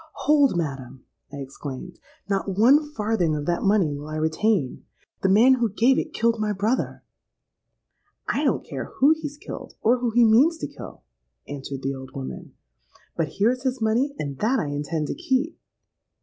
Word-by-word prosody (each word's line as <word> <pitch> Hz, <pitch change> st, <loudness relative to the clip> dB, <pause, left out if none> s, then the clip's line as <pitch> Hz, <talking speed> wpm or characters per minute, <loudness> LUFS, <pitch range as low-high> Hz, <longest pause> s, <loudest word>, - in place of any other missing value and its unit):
—'Hold, 285 Hz, -, +4 dB
madam!' 135 Hz, -5 st, -4 dB, 0.3 s
I -, -, -8 dB
exclaimed. 140 Hz, +4 st, -8 dB, 0.3 s
'Not 195 Hz, -1 st, -1 dB
one 285 Hz, +7 st, +5 dB
farthing 210 Hz, -, 0 dB
of 145 Hz, -1 st, -3 dB
that 175 Hz, +1 st, 0 dB
money 195 Hz, -7 st, +2 dB
will 145 Hz, +1 st, -8 dB
I 155 Hz, -, -5 dB
retain! 160 Hz, -, 0 dB, 0.4 s
The 190 Hz, -, +2 dB
man 230 Hz, +7 st, +6 dB
who 240 Hz, -3 st, +1 dB
gave 235 Hz, +6 st, +3 dB
it -, -, -4 dB
killed 230 Hz, 0 st, +1 dB
my 210 Hz, -1 st, 0 dB
brother!'—'I 210 Hz, +6 st, -6 dB
don't -, -, +1 dB
care -, -, -5 dB
who 280 Hz, +3 st, +5 dB
he's 290 Hz, -1 st, -6 dB
killed, -, -, -9 dB
or 245 Hz, +3 st, +4 dB
who 245 Hz, -1 st, 0 dB
he 235 Hz, +1 st, +4 dB
means 265 Hz, +10 st, +5 dB
to -, -, -4 dB
kill,' -, -, -11 dB, 0.4 s
answered 140 Hz, -1 st, -6 dB
the 135 Hz, +1 st, -1 dB
old 130 Hz, 0 st, -10 dB
woman, 135 Hz, -1 st, -7 dB, 0.6 s
'But 160 Hz, -3 st, -2 dB
here's 240 Hz, +5 st, +1 dB
his 260 Hz, -1 st, -1 dB
money; 235 Hz, +6 st, +1 dB
and 140 Hz, -2 st, -5 dB
that 240 Hz, +5 st, +2 dB
I 150 Hz, -, -2 dB
intend 150 Hz, +2 st, -2 dB
to -, -, -3 dB
keep.' 300 Hz, -1 st, -1 dB
210 Hz, 170 wpm, -24 LUFS, 150-250 Hz, 0.6 s, man